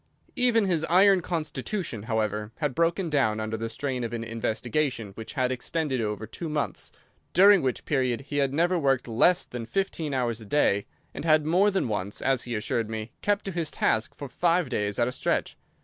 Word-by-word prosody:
Even 245 -5 +3
his 170 -5 +1
iron 190 +2 +5
constitution, 160 - -3
however, 105 -1 -2
had 150 -4 -2
broken 170 +4 +1
down 135 -8 +1
under 110 0 -3
the 115 +1 -4
strain 130 +1 -3
of 115 - -4
an 115 -1 -3
investigation 115 +1 -2
which 110 +3 -9
had 130 -3 0
extended 130 +1 -1
over 105 0 -3
two 165 +8 -6
months, 150 -1 -3 0.4
during 195 +1 +7
which 130 -2 -2
period 130 -5 0
he 145 +1 -5
had 140 -2 +2
never 175 +5 +2
worked 135 -4 +1
less 170 +10 +3
than 120 -1 -6
fifteen 190 -5 -2
hours 120 -4 -1
a - - -10
day, 100 -7 +2 0.3
and - - -6
had 155 -2 +4
more 180 +6 +4
than 190 -8 0
once, 105 -2 -3
as 135 -2 0
he 120 -1 -3
assured 110 +1 -1
me, 110 0 -5
kept 205 0 0
to 195 - -3
his 165 -3 -2
task 110 - 0
for 140 - -7
five 170 +2 +1
days 105 -4 -1
at 120 - +2
a - - -1
stretch. - - -1
135 Hz, 195 wpm, -27 LUFS, 115-170 Hz, 0.4 s, during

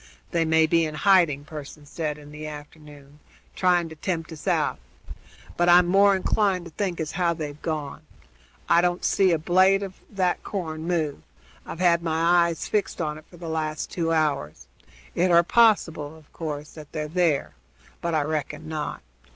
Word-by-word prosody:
"They 170 -2 +1
may 160 0 +4
be 165 +1 +2
in 155 -1 -3
hiding," 155 -5 +3
Pearson 150 -1 -9
said 150 0 -4
in 145 0 -13
the 155 +1 -7
afternoon, 150 -1 -12 0.4
"trying 180 -2 +2
to 160 - -10
tempt 165 0 -3
us 160 - -10
out; - - +1 0.8
but 175 0 +2
I'm 175 0 +7
more 195 +2 +5
inclined 190 -1 0
to 170 - -10
think 180 0 -3
as 155 -2 -3
how 175 -2 0
they've 150 -2 -6
gone. 150 -3 -4 0.7
I 170 0 +5
don't 175 0 0
see 195 -1 +3
a 165 - +3
blade 185 +5 +3
of 195 -1 -6 0.2
that 185 -3 0
corn 160 -5 -5
move; 160 -5 -1 0.5
I've 170 - -6
had 170 -2 +4
my 170 +1 +3
eyes 165 -1 -4
fixed 210 -2 -1
on 155 -2 -2
it 155 - -19
for 175 - -15
the 170 0 -8
last 155 -1 -3
two 165 -2 -1
hours. 150 - -1 0.5
It 180 +1 +2
are 170 0 +6
possible, 165 -8 +2
of 155 -2 -21
course, 150 -2 -5
that 150 -2 -12
they're 150 -1 -3
there, 165 -2 0 0.5
but 170 -1 -1
I 155 - +2
reckon 150 0 -4
not. 155 -2 -4
160 Hz, 180 wpm, -25 LUFS, 150-175 Hz, 0.8 s, I'm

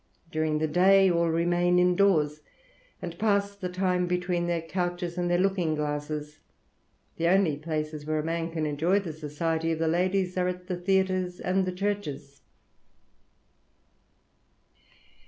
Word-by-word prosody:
During 155 -1 0
the 155 +1 0
day 190 +4 +5
all 170 -1 +2
remain 175 +2 +2
indoors, 180 -5 +3 0.6
and 170 -1 -6
pass 200 -2 +1
the 190 -3 -5
time 180 -1 0
between 180 -1 -1
their 170 -1 -1
couches 175 0 -3
and 175 -1 -1
their 175 - +3
looking 180 -4 +1
glasses. 150 0 -4 0.8
The 170 - +1
only 185 -4 +3
places 155 0 -4
where 155 0 0
a 155 - -1
man 165 +1 -2
can 160 -2 -2
enjoy 155 +6 +1
the 170 -5 -6
society 160 +2 -2
of 160 - -1
the 165 0 0
ladies 180 +2 +1
are 180 0 +1
the 180 0 -6
theatres 185 -1 0
and 185 +1 0
the - - 0
churches." 180 -8 -4
175 Hz, 140 wpm, -27 LUFS, 155-185 Hz, 0.8 s, day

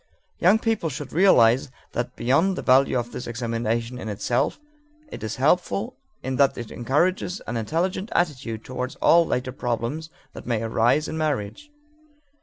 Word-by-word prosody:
Young 185 +5 +5
people 220 -7 -1
should 140 0 -7
realize 130 -9 +5
also 130 - -25 0.2
that 120 +1 -3
beyond 160 +10 +2
the - - -5
value 130 0 +4
of 120 0 -3
this - - -6
examination 115 +1 -2
in 110 - -5
itself, 120 - -1 0.5
it - - -8
is 110 0 -4
helpful 180 - +1 0.3
in 130 -1 -2
that 140 -1 +3
it 120 -2 -7
encourages 175 - 0
an 120 - -4
intelligent 170 - -1
attitude 130 -10 -1
toward 130 0 -4
all 170 0 +5
later 125 +1 -1
problems 120 +6 -3 0.2
that - - -10
may 115 -2 0
arise 115 +7 +2
in 160 - -4
marriage. 155 - -2
130 Hz, 160 wpm, -24 LUFS, 115-165 Hz, 0.5 s, Young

